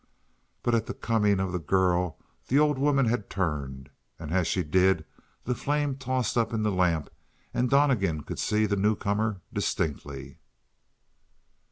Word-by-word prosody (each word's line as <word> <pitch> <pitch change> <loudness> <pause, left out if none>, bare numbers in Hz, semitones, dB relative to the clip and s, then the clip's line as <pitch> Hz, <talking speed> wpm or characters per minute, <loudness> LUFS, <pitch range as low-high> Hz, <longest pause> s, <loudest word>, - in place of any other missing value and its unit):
But 120 - +1
at 115 -2 +1
the - - -5
coming 105 -4 +1
of 95 -1 -1
the 90 - -2
girl 90 +1 +1 0.3
the 135 - +2
old 150 -2 +3
woman 140 -1 +3
had 110 -3 -1
turned, 70 -7 -3 0.3
and 80 -2 -7
as 90 -1 +2
she 90 - 0
did 90 +1 +2 0.4
the 125 - -1
flame 145 +2 -1
tossed 130 -2 -1
up 115 - 0
in 110 -1 0
the 105 - +1
lamp 90 -5 +1 0.4
and 125 0 +1
Donnegan 115 - +2
could - - -6
see 105 0 +2
the 100 -1 0
newcomer 105 0 0
distinctly. 70 -3 -3
100 Hz, 155 wpm, -27 LUFS, 85-120 Hz, 0.4 s, old